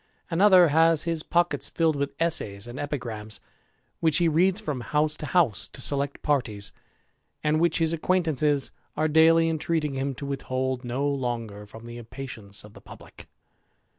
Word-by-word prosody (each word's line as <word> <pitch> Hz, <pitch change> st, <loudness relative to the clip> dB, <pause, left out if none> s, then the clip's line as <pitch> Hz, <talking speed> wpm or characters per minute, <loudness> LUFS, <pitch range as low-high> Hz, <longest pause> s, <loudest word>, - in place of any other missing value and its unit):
Another 180 Hz, -1 st, +6 dB
has 160 Hz, +1 st, +4 dB
his 165 Hz, -1 st, -1 dB
pockets 175 Hz, +2 st, 0 dB
filled 160 Hz, -2 st, +1 dB
with 140 Hz, 0 st, -3 dB
essays 110 Hz, -12 st, 0 dB
and 120 Hz, +2 st, -8 dB
epigrams, 115 Hz, -7 st, -5 dB, 0.6 s
which 160 Hz, -2 st, +3 dB
he 170 Hz, -1 st, +3 dB
reads 180 Hz, +5 st, +3 dB
from 150 Hz, -, -4 dB
house 150 Hz, +5 st, +1 dB
to 150 Hz, -, -6 dB
house 165 Hz, -, +2 dB
to -, -, -9 dB
select 140 Hz, +1 st, 0 dB
parties, 120 Hz, -9 st, -1 dB, 0.7 s
and 155 Hz, 0 st, +2 dB
which 170 Hz, -1 st, +2 dB
his 165 Hz, -1 st, +1 dB
acquaintances 155 Hz, -5 st, +1 dB, 0.3 s
are 155 Hz, +1 st, +2 dB
daily 165 Hz, +1 st, +5 dB
entreating 160 Hz, -2 st, -1 dB
him 135 Hz, 0 st, -2 dB
to 140 Hz, -, -7 dB
withhold 130 Hz, -2 st, -3 dB
no 125 Hz, +4 st, -2 dB
longer 120 Hz, -7 st, -3 dB
firom 110 Hz, +3 st, -12 dB
the 120 Hz, 0 st, -8 dB
impatience 115 Hz, -4 st, -7 dB
of 105 Hz, 0 st, -14 dB
the -, -, -14 dB
publick. -, -, -14 dB
145 Hz, 160 wpm, -26 LUFS, 125-165 Hz, 0.7 s, Another